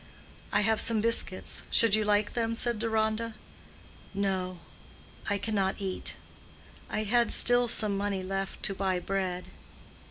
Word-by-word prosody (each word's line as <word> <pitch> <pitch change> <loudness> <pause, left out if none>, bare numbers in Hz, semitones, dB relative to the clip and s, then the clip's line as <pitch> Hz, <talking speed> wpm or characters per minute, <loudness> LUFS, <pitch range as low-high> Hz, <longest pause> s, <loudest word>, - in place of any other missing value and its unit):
"I - - +2
have 220 +1 +2
some 230 -2 +3
biscuits—should 225 0 +1
you 215 0 +4
like 205 0 +1
them?" 230 -1 -1
said 235 -1 +1
Deronda. 220 0 -1 0.8
"No; 190 -2 -2 0.7
I 205 - +1
cannot 200 -2 -1
eat. 190 -2 -2 0.7
I 215 - -2
had 235 +3 +2
still 245 0 +6
some 215 -3 +1
money 200 -1 -2
left 195 +1 -4
to 195 - +1
buy 190 -1 -1
bread." 185 -1 -3
205 Hz, 130 wpm, -29 LUFS, 195-225 Hz, 0.8 s, still